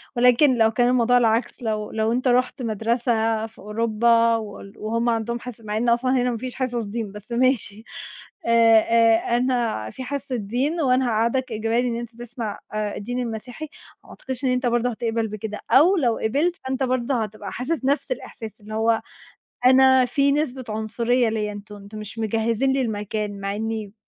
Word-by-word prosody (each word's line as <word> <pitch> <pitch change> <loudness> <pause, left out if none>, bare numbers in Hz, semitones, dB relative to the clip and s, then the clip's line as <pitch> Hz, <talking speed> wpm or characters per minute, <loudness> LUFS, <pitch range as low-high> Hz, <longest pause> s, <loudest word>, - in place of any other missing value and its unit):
ولكن 250 +2 +5
لو 225 0 +4
كان 245 +2 +2
الموضوع 245 0 +4
العكس، 230 +1 +1
لو 215 -2 -2
لو 220 +1 0
أنت 255 +2 0
رُحت 250 +1 +1
مدرسة 225 0 0
في 225 - -20
أوروبا 230 +2 +2
وال 205 -2 -7
وهُم 230 +2 -1
عندهم 235 +1 -1
حص 240 -2 -8
مع 210 0 -3
إن 235 +2 +1
أصلًا 245 +2 +2
هنا 250 -1 +2
ما 230 - -3
فيش 255 +2 -6
حصص 245 -3 -2
دين، 210 -1 -4
بس 210 +3 -10
ماشي، 235 -4 0 0.6
آآ، 230 -1 +6
آآ، 230 +1 +3
أنا 240 - 0
في 260 - -7
حصة 275 -1 -3
دين 255 +11 -1
وأنا 255 -1 +3
هاقعدك 235 +3 0
إجباري 225 +3 0
إن 235 - -1
أنت 235 -1 -8
تسمع 235 -3 -5
آآ، 210 -1 -2
الدين 245 +4 -4
المسيحي، 245 +6 -5 0.3
وما - - -19
أعتقدش 260 0 -6
إن - - +3
أنت 250 +1 0
برضو 240 +1 +1
هتقبل 230 -1 -2
بكده، 210 0 -6
أو 355 +8 +6
لو 240 -7 +1
قبلت 290 +11 0
فأنت 265 0 -2
برضو 255 +1 0
هتبقى 215 -4 -3
حاسس 265 +2 -2
نفس 285 - 0
الإحساس 220 - -7
اللي 215 +1 -9
هو 225 +1 +2 0.6
أنا 260 0 +6
في 280 +3 +2
نسبة 270 -3 -1
عنصرية 230 +3 0
ليَّ، 215 -1 -2
أنتم 205 0 -9
أنتم 205 +1 -11
مش 215 +2 -8
مجهزين 225 +4 0
لي 270 - +1
المكان 210 -2 -3
مع 200 +1 -2
إني 220 -2 -4
230 Hz, 180 wpm, -23 LUFS, 220-250 Hz, 0.6 s, آآ